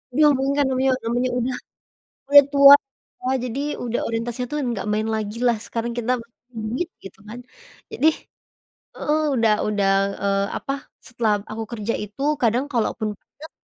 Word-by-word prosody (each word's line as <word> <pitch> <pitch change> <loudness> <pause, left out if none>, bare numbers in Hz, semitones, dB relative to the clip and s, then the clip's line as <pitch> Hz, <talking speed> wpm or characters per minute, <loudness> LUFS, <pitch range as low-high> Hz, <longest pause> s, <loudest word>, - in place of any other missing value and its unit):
Belum 300 -1 +6
mung 270 +1 0
kan 285 - +3
ngemil 260 0 +1
namanya 245 +2 0
udah 250 +1 -2 0.7
udah 285 0 +9
tua 280 0 +9 0.5
ya - - -1 0.2
jadi 260 +5 -4 0.2
udah 240 0 -2
orientasinya 235 +2 -3
tuh 300 - -1
nggak 240 -6 -3
main 215 +1 -1
lagilah 220 +2 0
sekarang 235 0 -3
kita 240 +1 0 0.3
duit 230 +9 -3 0.2
gitu 195 - -11
kan. 240 +3 -8 0.5
Jadi 315 - +3 0.9
heeh, 305 +1 0
udah 225 -2 +3
udah, 200 -2 +1 0.3
eee, 200 0 +1
apa, 275 - -4 0.3
setelah 235 -4 0 0.2
aku 225 +1 -4
kerja 225 -1 -3
itu 210 +6 -10 0.2
kadang 240 +4 +2
kalaupun 225 -2 -1
deket, 315 +3 -15
240 Hz, 150 wpm, -22 LUFS, 220-265 Hz, 0.9 s, udah